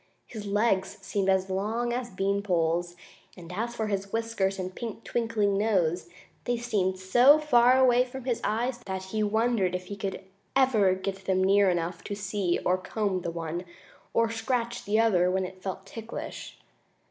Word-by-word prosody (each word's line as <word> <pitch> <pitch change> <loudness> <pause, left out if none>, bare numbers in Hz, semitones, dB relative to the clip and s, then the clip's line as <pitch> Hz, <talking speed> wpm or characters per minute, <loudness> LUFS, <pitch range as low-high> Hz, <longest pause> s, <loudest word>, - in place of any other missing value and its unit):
His 215 -3 -8
legs 200 -1 +1
seemed 195 -1 -1
as 190 0 +2
long 220 +5 -1
as 245 0 -3
bean 200 0 0
poles, 175 -2 0 0.4
and 175 0 -10
as 230 +5 -3
for 220 - -1
his 200 -1 -3
whiskers 225 -4 -1
and 185 0 -4
pink, 230 +1 -6
twinkling 215 -4 0
nose, 180 -5 +1 0.4
they 245 0 0
seemed 200 -6 0
so 240 +10 +6
far 255 -4 +5
away 250 -1 +5
from 255 +1 -8
his 245 -2 -1
eyes 240 +3 -1
that 190 -1 -3
he 215 +3 -3
wondered 215 -3 +1
if 180 0 -4
he 200 +2 -8
would 195 0 -3 0.3
ever 220 -8 +4
get 195 0 -5
them 185 -1 +2
near 200 +1 +5
enough 170 -1 -2
to 205 - -3
see 195 -3 -1
to 180 +1 +1
comb 195 0 -2
the 170 - -3
one, 170 +1 -4 0.5
or 230 0 +2
scratch 235 +1 -2
the 210 +2 +2
other 185 -6 +4
when 190 0 0
it 185 0 -10
felt 190 0 -5
ticklish. 225 +3 -7
200 Hz, 175 wpm, -28 LUFS, 185-230 Hz, 0.5 s, so